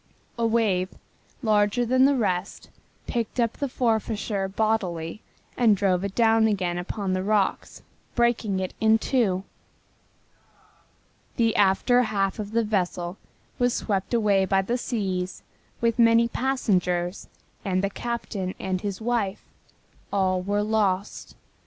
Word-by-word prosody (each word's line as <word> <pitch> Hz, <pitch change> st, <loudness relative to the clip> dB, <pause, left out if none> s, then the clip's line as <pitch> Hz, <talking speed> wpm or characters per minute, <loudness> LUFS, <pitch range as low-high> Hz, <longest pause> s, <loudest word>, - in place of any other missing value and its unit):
A 230 Hz, -1 st, +1 dB
wave, 205 Hz, -5 st, +1 dB, 0.5 s
larger 215 Hz, +2 st, +2 dB
than 255 Hz, +2 st, +4 dB
the 280 Hz, 0 st, +4 dB
rest, 190 Hz, -5 st, -2 dB, 0.4 s
picked 235 Hz, +1 st, -3 dB
up 235 Hz, -1 st, +2 dB
the 280 Hz, -, -3 dB
Forfarshire 220 Hz, -4 st, -1 dB
bodily 190 Hz, -4 st, -1 dB, 0.3 s
and 225 Hz, -4 st, +4 dB
drove 185 Hz, -2 st, +1 dB
it 200 Hz, -1 st, -4 dB
down 225 Hz, -1 st, +4 dB
again 180 Hz, -4 st, -1 dB
upon 190 Hz, +1 st, -3 dB
the 185 Hz, -, 0 dB
rocks, 205 Hz, 0 st, -1 dB, 0.3 s
breaking 235 Hz, -5 st, +1 dB
it 185 Hz, -1 st, -3 dB
in 220 Hz, 0 st, +5 dB
two. 215 Hz, -6 st, 0 dB, 1.9 s
The 230 Hz, -3 st, +2 dB
after 205 Hz, +5 st, +4 dB
half 200 Hz, -3 st, -1 dB
of 205 Hz, -1 st, -4 dB
the 230 Hz, +1 st, +2 dB
vessel 180 Hz, -3 st, -2 dB, 0.4 s
was 245 Hz, -1 st, +2 dB
swept 195 Hz, -3 st, -2 dB
away 205 Hz, -4 st, +3 dB
by 195 Hz, +1 st, +2 dB
the 235 Hz, +6 st, -1 dB
seas 190 Hz, -7 st, -3 dB, 0.4 s
with 230 Hz, 0 st, +1 dB
many 230 Hz, 0 st, +5 dB
passengers 185 Hz, -9 st, -1 dB, 0.4 s
and 185 Hz, -1 st, 0 dB
the 200 Hz, -, +1 dB
captain 205 Hz, -5 st, -4 dB
and 185 Hz, -1 st, -2 dB
his 200 Hz, 0 st, -4 dB
wife. 220 Hz, -4 st, -1 dB, 0.7 s
All 185 Hz, -2 st, +1 dB
were 205 Hz, +2 st, 0 dB
lost. 205 Hz, -3 st, -1 dB
205 Hz, 130 wpm, -25 LUFS, 190-230 Hz, 1.9 s, in